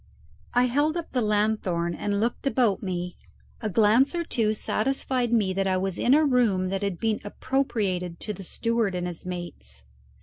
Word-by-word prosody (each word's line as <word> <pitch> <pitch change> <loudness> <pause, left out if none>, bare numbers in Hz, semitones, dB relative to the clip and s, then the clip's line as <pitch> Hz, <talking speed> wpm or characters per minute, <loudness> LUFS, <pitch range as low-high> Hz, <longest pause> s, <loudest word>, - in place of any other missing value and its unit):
I 245 - +5
held 290 +6 +1
up 340 - -5
the 250 - 0
lanthorn 205 -5 +1
and 200 +3 -1
looked 235 +5 -1
about 240 -7 +2
me. 180 -2 -4 0.4
A 215 - -1
glance 225 - +4
or 340 - 0
two 220 -8 0
satisfied 255 +2 0
me 210 -5 +2
that 195 +1 0
I 185 -1 +2
was 190 0 -2
in 255 +3 +4
a 310 +1 +4
room 225 -9 +2
that 195 0 -2
had 200 -3 -2
been 220 -2 0
appropriated 205 -7 -1
to 210 - -4
the 195 - -9
steward 230 0 -1
and 180 0 -2
his 175 0 -6
mates. 70 - -7
210 Hz, 180 wpm, -26 LUFS, 185-245 Hz, 0.4 s, I